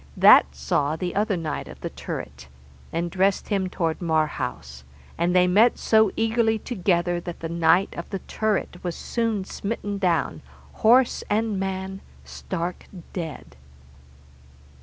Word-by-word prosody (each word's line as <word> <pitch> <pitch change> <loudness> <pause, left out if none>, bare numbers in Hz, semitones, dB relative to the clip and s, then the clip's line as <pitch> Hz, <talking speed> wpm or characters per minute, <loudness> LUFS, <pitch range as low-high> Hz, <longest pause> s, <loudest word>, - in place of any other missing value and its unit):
That 65 0 +7
saw 140 - 0
the 175 +2 -3
other 205 -1 +1
knight 165 -2 -4
of - - -11
the - - -4
turret, - - -7 0.4
and 170 +1 -2
dressed 190 +1 +1
him 195 -3 0
toward 165 -3 -2
Marhaus, 155 - -2 0.3
and 175 +2 0
they 180 0 +6
met 210 +7 +4
so 220 -2 +4
eagerly 225 0 +2
together 175 -6 0
that 175 0 -8
the 165 - -4
knight 170 +3 +3
of 170 - -7
the 195 - -3
turret 205 -2 -2
was 175 -2 -3
soon 225 -5 -2
smitten 205 0 -4
down, 165 - 0 0.4
horse 240 +3 +4
and 215 -1 0
man, 190 0 -4 0.2
stark 175 -1 -5 0.3
dead. 165 - -6
185 Hz, 140 wpm, -24 LUFS, 170-205 Hz, 0.4 s, That